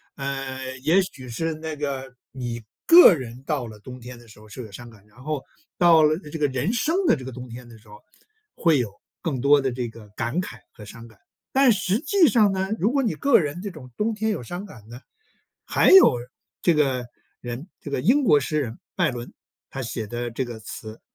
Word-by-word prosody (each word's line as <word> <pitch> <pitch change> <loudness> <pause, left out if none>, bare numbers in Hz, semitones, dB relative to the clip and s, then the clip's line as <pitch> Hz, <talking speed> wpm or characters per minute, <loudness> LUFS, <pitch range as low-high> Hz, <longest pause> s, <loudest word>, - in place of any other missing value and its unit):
呃， 135 -1 -5
也 160 +9 +4
许 135 -8 -8
是 160 +7 -2
那 160 0 -6
个 135 -3 -4 0.2
你 120 -3 -5 0.2
个 340 - +9
人 125 -2 -8
到 140 -4 -2
了 110 -1 -11
冬 125 +4 -10
天 125 0 -10
的 120 - -17
时 105 -1 -16
候 110 - -16
是 105 +4 -9
有 110 - -11
伤 120 +4 -10
感， 105 -3 -18
然 105 +4 -19
后 150 -2 -3 0.3
到 170 -2 +6
了 155 +1 +3
这 160 -3 -8
个 150 - +3
人 130 - -1
生 305 +8 0
的 - - +5
这 130 -4 -9
个 130 - -6
冬 125 0 -9
天 120 +1 -10
的 115 -1 -14
时 110 - -23
候 105 - -13 0.6
会 165 -3 +3
有 115 -5 -2 0.3
更 145 -8 -2
多 145 +2 +5
的 135 -1 -1
这 120 -1 -3
个 110 -1 -13
感 120 - -3
慨 - - -8
和 105 - -13
伤 115 +2 -11
感。 110 -4 -20 0.3
但 270 -1 +5
实 195 0 +1
际 365 +1 +4
上 215 -6 +4
呢， 190 0 -2
如 210 +6 +2
果 280 0 +2
你 230 -8 0
个 280 - +4
人 155 +1 -3
这 200 0 -5
种 135 -7 -12
冬 220 +2 0
天 220 +1 -1
有 200 - -3
伤 175 - -6
感 115 - -14
呢， 120 +2 -10 0.6
还 - - +3
有 380 - +9 0.5
这 175 - +4
个 135 -5 +1 0.4
人， 120 +6 -6
这 145 - -8
个 130 - -1
英 255 - +3
国 150 - +5
诗 150 +3 -1
人 115 -4 -5 0.2
拜 - - +2
伦， 120 -1 -8 0.4
他 135 - -5
写 115 -2 -4
的 120 +2 -4
这 125 +4 -2
个 120 -2 -8
词， 110 0 -9
135 Hz, 240 characters per minute, -24 LUFS, 120-170 Hz, 0.6 s, 个